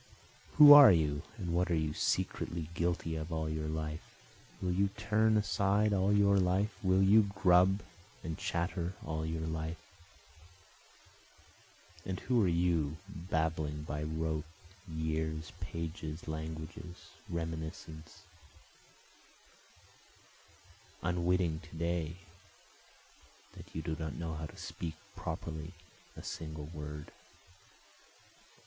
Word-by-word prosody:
(Who 150 Hz, -1 st, +12 dB
are 145 Hz, -5 st, +11 dB
you? 75 Hz, -4 st, +2 dB, 0.2 s
and 90 Hz, -4 st, -3 dB
what 90 Hz, +1 st, +1 dB
are 85 Hz, -, +2 dB
you 80 Hz, -2 st, 0 dB
secretly 85 Hz, 0 st, -1 dB
guilty 85 Hz, -1 st, -1 dB
of 80 Hz, +1 st, -5 dB
all 80 Hz, -1 st, -1 dB
your 80 Hz, 0 st, -2 dB
life? 80 Hz, 0 st, -3 dB, 0.6 s
Will 90 Hz, -, -1 dB
you 100 Hz, +3 st, +2 dB
turn 110 Hz, +1 st, +3 dB
aside 105 Hz, 0 st, +2 dB
all 95 Hz, +1 st, +2 dB
your 100 Hz, -1 st, +5 dB
life? 95 Hz, +4 st, +1 dB
will 95 Hz, -1 st, +3 dB
you 100 Hz, +1 st, +6 dB
grub 95 Hz, 0 st, +4 dB, 0.4 s
and 80 Hz, -1 st, -3 dB
chatter 85 Hz, +2 st, -2 dB
all 80 Hz, 0 st, -2 dB
your 80 Hz, 0 st, -3 dB
life? 80 Hz, +1 st, -3 dB, 2.3 s
And 95 Hz, +1 st, -4 dB
who 120 Hz, -4 st, +2 dB
are -, -, +3 dB
you, 85 Hz, -3 st, +1 dB
blabbing 80 Hz, -5 st, -2 dB
by 75 Hz, -1 st, -4 dB
rote, 80 Hz, 0 st, -2 dB, 0.5 s
years, 80 Hz, 0 st, -2 dB
pages, 85 Hz, -2 st, -5 dB
languages, 80 Hz, +2 st, -7 dB, 0.2 s
reminiscences, 80 Hz, +1 st, -6 dB, 2.8 s
Unwitting 90 Hz, -2 st, +1 dB
to 85 Hz, -, -12 dB
day 85 Hz, -1 st, -1 dB, 1.4 s
that -, -, -13 dB
you 80 Hz, -, -3 dB
do 80 Hz, 0 st, -2 dB
not 80 Hz, -5 st, -4 dB
know 80 Hz, +4 st, -4 dB
how 80 Hz, 0 st, -5 dB
to -, -, -15 dB
speak 80 Hz, -2 st, -5 dB, 0.2 s
properly 80 Hz, 0 st, -5 dB, 0.4 s
a -, -, -8 dB
single 80 Hz, -2 st, -6 dB
word?) 75 Hz, -1 st, -7 dB
80 Hz, 115 wpm, -33 LUFS, 80-95 Hz, 2.8 s, Who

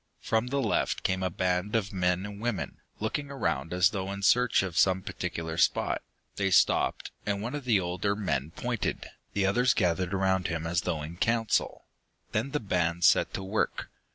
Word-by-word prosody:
From 110 Hz, +2 st, 0 dB
the 140 Hz, +3 st, -1 dB
left -, -, 0 dB
came 95 Hz, 0 st, 0 dB
a 95 Hz, -, 0 dB
band 90 Hz, +3 st, -1 dB
of 105 Hz, -1 st, 0 dB
men 90 Hz, 0 st, +1 dB
and 100 Hz, 0 st, -8 dB
women, 120 Hz, -4 st, -2 dB, 0.2 s
looking 140 Hz, +7 st, -2 dB
around 80 Hz, -, -2 dB
as 90 Hz, +2 st, +4 dB
though 95 Hz, -1 st, -3 dB
in 100 Hz, 0 st, -6 dB
search 125 Hz, +1 st, +4 dB
of 90 Hz, -4 st, -4 dB
some 95 Hz, +2 st, +3 dB
particular 80 Hz, -1 st, -4 dB
spot. -, -, +2 dB, 0.4 s
They 100 Hz, -1 st, +1 dB
stopped, 90 Hz, -, +2 dB
and 100 Hz, -1 st, -1 dB
one 115 Hz, +4 st, -4 dB
of 145 Hz, -3 st, -5 dB
the 115 Hz, -5 st, +4 dB
older 90 Hz, +3 st, -1 dB
men 75 Hz, -9 st, -1 dB
pointed, 120 Hz, +6 st, -3 dB, 0.3 s
the 100 Hz, -1 st, +1 dB
others 120 Hz, +6 st, +3 dB
gathering 90 Hz, -1 st, +1 dB
around 95 Hz, -1 st, +1 dB
him 80 Hz, 0 st, -3 dB
as 85 Hz, +1 st, 0 dB
though 75 Hz, -2 st, -2 dB
in 80 Hz, +3 st, -7 dB
council. 115 Hz, +2 st, 0 dB, 0.5 s
Then 110 Hz, +6 st, 0 dB
the 150 Hz, -, -1 dB
band 85 Hz, -5 st, 0 dB
set -, -, +5 dB
to 95 Hz, -, -4 dB
work. 100 Hz, +3 st, -2 dB
95 Hz, 185 wpm, -29 LUFS, 90-110 Hz, 0.5 s, set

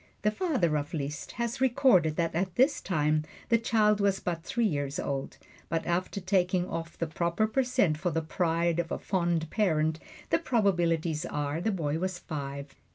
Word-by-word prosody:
The 210 Hz, -, +3 dB
father 215 Hz, -, +1 dB
of 145 Hz, +3 st, -5 dB
Liszt 145 Hz, 0 st, -4 dB
has 235 Hz, +1 st, -3 dB
recorded 245 Hz, -, +4 dB
that 165 Hz, 0 st, 0 dB
at 180 Hz, +1 st, -1 dB
this 265 Hz, -, +3 dB
time 155 Hz, -3 st, +1 dB, 0.3 s
the 230 Hz, -1 st, +4 dB
child 210 Hz, -2 st, +3 dB
was 200 Hz, -1 st, +2 dB
but 170 Hz, -2 st, -3 dB
three 235 Hz, +7 st, -1 dB
years 145 Hz, -6 st, -1 dB
old, 135 Hz, -1 st, -3 dB, 0.3 s
but 165 Hz, 0 st, -1 dB
after 180 Hz, +3 st, -1 dB
taking 185 Hz, -1 st, +1 dB
off 165 Hz, 0 st, -5 dB
the 165 Hz, -, -1 dB
proper 170 Hz, +5 st, 0 dB
per 220 Hz, +5 st, +1 dB
cent 195 Hz, -11 st, +1 dB
for 175 Hz, -, 0 dB
the 165 Hz, 0 st, -1 dB
pride 170 Hz, +1 st, 0 dB
of 170 Hz, -1 st, -2 dB
a -, -, -1 dB
fond 170 Hz, -4 st, 0 dB
parent, 160 Hz, -6 st, +1 dB, 0.3 s
the -, -, +4 dB
probabilities 175 Hz, -, +1 dB
are 145 Hz, +2 st, -2 dB
the 220 Hz, -, 0 dB
boy 160 Hz, -6 st, -1 dB
was 185 Hz, 0 st, -2 dB
five. 140 Hz, -3 st, -6 dB
170 Hz, 180 wpm, -29 LUFS, 155-200 Hz, 0.3 s, recorded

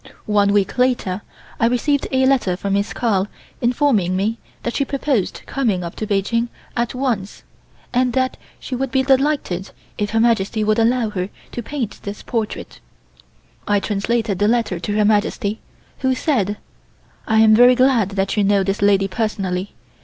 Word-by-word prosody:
One 205 Hz, -1 st, +3 dB
week 205 Hz, +4 st, +1 dB
later 240 Hz, -7 st, +1 dB, 0.4 s
I 230 Hz, -, +4 dB
received 275 Hz, +4 st, +1 dB
a 260 Hz, 0 st, +3 dB
letter 250 Hz, -10 st, +2 dB
from 200 Hz, +1 st, -2 dB
Miss 200 Hz, +1 st, 0 dB
Carl 205 Hz, -5 st, 0 dB, 0.3 s
informing 240 Hz, -7 st, +2 dB
me 215 Hz, +4 st, -1 dB, 0.2 s
that 235 Hz, -, -2 dB
she 280 Hz, -, +2 dB
proposed 275 Hz, -6 st, -1 dB
coming 220 Hz, -10 st, -1 dB
up 170 Hz, -, -6 dB
to 215 Hz, -, -3 dB
Peking 230 Hz, +4 st, 0 dB, 0.3 s
at 240 Hz, +2 st, -1 dB
once, 235 Hz, -7 st, -2 dB, 0.5 s
and 250 Hz, 0 st, +2 dB
that 260 Hz, -1 st, +1 dB, 0.2 s
she 260 Hz, -, -5 dB
would 265 Hz, +1 st, -2 dB
be 265 Hz, +1 st, +1 dB
delighted 265 Hz, -, +1 dB, 0.3 s
if 205 Hz, 0 st, 0 dB
Her 225 Hz, +1 st, +1 dB
Majesty 225 Hz, -2 st, +2 dB
would 215 Hz, +1 st, +2 dB
allow 230 Hz, -1 st, +2 dB
her 185 Hz, -2 st, -3 dB, 0.2 s
to 240 Hz, -, -4 dB
paint 240 Hz, -3 st, -4 dB
this 200 Hz, +1 st, -7 dB
portrait. 225 Hz, -3 st, -4 dB, 0.9 s
I 205 Hz, -1 st, +3 dB
translated 210 Hz, 0 st, -1 dB
the 205 Hz, -, +3 dB
letter 225 Hz, -6 st, +1 dB
to 205 Hz, +4 st, -3 dB
Her 210 Hz, -, +3 dB
Majesty, 210 Hz, 0 st, +1 dB, 0.4 s
who 260 Hz, -1 st, +1 dB
said: 210 Hz, -, 0 dB, 0.7 s
"I 220 Hz, -1 st, +4 dB
am 220 Hz, -1 st, +6 dB
very 245 Hz, +3 st, +7 dB
glad 255 Hz, -6 st, +3 dB
that 195 Hz, 0 st, 0 dB
you 210 Hz, -, +2 dB
know 200 Hz, 0 st, +3 dB
this 195 Hz, +1 st, -2 dB
lady 200 Hz, -1 st, +4 dB
personally. 195 Hz, -2 st, -2 dB
220 Hz, 170 wpm, -20 LUFS, 200-250 Hz, 0.9 s, very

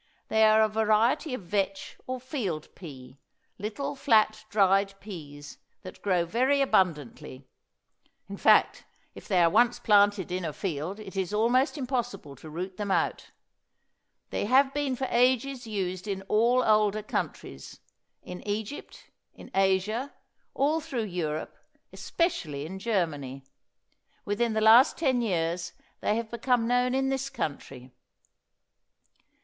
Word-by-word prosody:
They 220 Hz, 0 st, +3 dB
are 215 Hz, 0 st, +5 dB
a -, -, +3 dB
variety 220 Hz, +6 st, +1 dB
of 215 Hz, -, -9 dB
vetch 195 Hz, +1 st, -2 dB
or 255 Hz, 0 st, -3 dB
field 235 Hz, -, -4 dB
pea, 135 Hz, -6 st, -12 dB, 0.4 s
little 215 Hz, +8 st, -4 dB
flat, 220 Hz, -5 st, +2 dB
dried 195 Hz, -1 st, +2 dB
peas, 145 Hz, -8 st, -10 dB, 0.2 s
that 185 Hz, -, -11 dB
grow 180 Hz, -4 st, +1 dB
very 260 Hz, +9 st, +1 dB
abundantly; 155 Hz, -, -1 dB, 0.8 s
in -, -, -7 dB
fact, -, -, +4 dB, 0.3 s
if -, -, -12 dB
they 180 Hz, -2 st, +3 dB
are 165 Hz, -, +5 dB
once 240 Hz, +3 st, +3 dB
planted 205 Hz, -3 st, +3 dB
in 180 Hz, 0 st, -2 dB
a 160 Hz, -3 st, -3 dB
field 175 Hz, +4 st, -4 dB
it 200 Hz, -2 st, -10 dB
is 190 Hz, +1 st, -2 dB
almost 250 Hz, +7 st, +2 dB
impossible 245 Hz, -, -4 dB
to 155 Hz, -, -11 dB
root 180 Hz, +4 st, -6 dB
them 205 Hz, -1 st, -4 dB
out. 190 Hz, -, -1 dB, 1.0 s
They -, -, -2 dB
have 265 Hz, +4 st, +4 dB
been 285 Hz, -2 st, -1 dB
for 265 Hz, -, -3 dB
ages 250 Hz, +1 st, +1 dB
used 185 Hz, -2 st, -3 dB
in 195 Hz, -1 st, -3 dB
all 235 Hz, +5 st, +2 dB
older 215 Hz, -1 st, +2 dB
countries, 70 Hz, -, -5 dB, 0.4 s
in 180 Hz, 0 st, -8 dB
Egypt, 210 Hz, +6 st, -6 dB, 0.2 s
in -, -, -13 dB
Asia, 195 Hz, +7 st, +1 dB, 0.4 s
all 305 Hz, +4 st, +1 dB
through 265 Hz, -7 st, -3 dB
Europe, 165 Hz, -6 st, -4 dB, 0.4 s
especially 155 Hz, -, -2 dB
in 190 Hz, +4 st, -7 dB
Germany. 150 Hz, -, -2 dB, 0.8 s
Within 220 Hz, +3 st, 0 dB
the 220 Hz, -, 0 dB
last 225 Hz, +4 st, +6 dB
ten 260 Hz, -6 st, +1 dB
years 170 Hz, -4 st, -2 dB, 0.3 s
they 210 Hz, -, 0 dB
have 230 Hz, -1 st, -4 dB
become 235 Hz, -1 st, 0 dB
known 250 Hz, +1 st, +1 dB
in 270 Hz, 0 st, +1 dB
this 270 Hz, 0 st, -2 dB
country. 140 Hz, -, -6 dB
210 Hz, 135 wpm, -27 LUFS, 180-245 Hz, 1.0 s, last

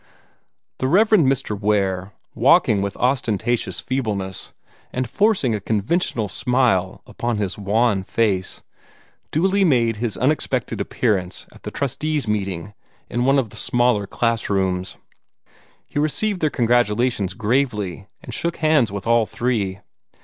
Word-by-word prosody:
The 130 Hz, -, 0 dB
Rev. 210 Hz, +9 st, +4 dB
Mr. 135 Hz, -, +3 dB
Ware, 100 Hz, -2 st, 0 dB, 0.2 s
walking 100 Hz, -3 st, +4 dB
with 100 Hz, 0 st, -3 dB
ostentatious 120 Hz, -2 st, 0 dB
feebleness, 105 Hz, -8 st, -3 dB, 0.4 s
and 130 Hz, 0 st, -2 dB
forcing 195 Hz, -, +2 dB
a 105 Hz, -, -1 dB
conventional 110 Hz, -, 0 dB
smile 115 Hz, -5 st, +1 dB
upon 120 Hz, -2 st, -3 dB
his 100 Hz, -3 st, -2 dB
wan 105 Hz, 0 st, +1 dB
face, 95 Hz, -2 st, -1 dB, 0.7 s
duly 190 Hz, +5 st, +2 dB
made 120 Hz, -, +2 dB
his 115 Hz, -1 st, -3 dB
unexpected 130 Hz, -3 st, 0 dB
appearance 95 Hz, -6 st, -1 dB
at -, -, -17 dB
the -, -, -5 dB
trustees' 145 Hz, 0 st, -2 dB
meeting 100 Hz, -3 st, -2 dB, 0.4 s
in 120 Hz, +1 st, 0 dB
one 135 Hz, +1 st, +4 dB
of 120 Hz, -6 st, 0 dB
the -, -, -12 dB
smaller 120 Hz, -4 st, +1 dB
classrooms. 95 Hz, -6 st, -1 dB, 0.9 s
He -, -, -4 dB
received 175 Hz, +7 st, 0 dB
their 155 Hz, -, +3 dB
congratulations 120 Hz, -5 st, +1 dB
gravely, 110 Hz, -5 st, -1 dB, 0.2 s
and 120 Hz, -, -8 dB
shook 170 Hz, +7 st, -2 dB
hands 155 Hz, -8 st, +3 dB
with 100 Hz, -1 st, -5 dB
all 115 Hz, -1 st, +3 dB
three. 100 Hz, -6 st, -2 dB
115 Hz, 125 wpm, -21 LUFS, 100-130 Hz, 0.9 s, Rev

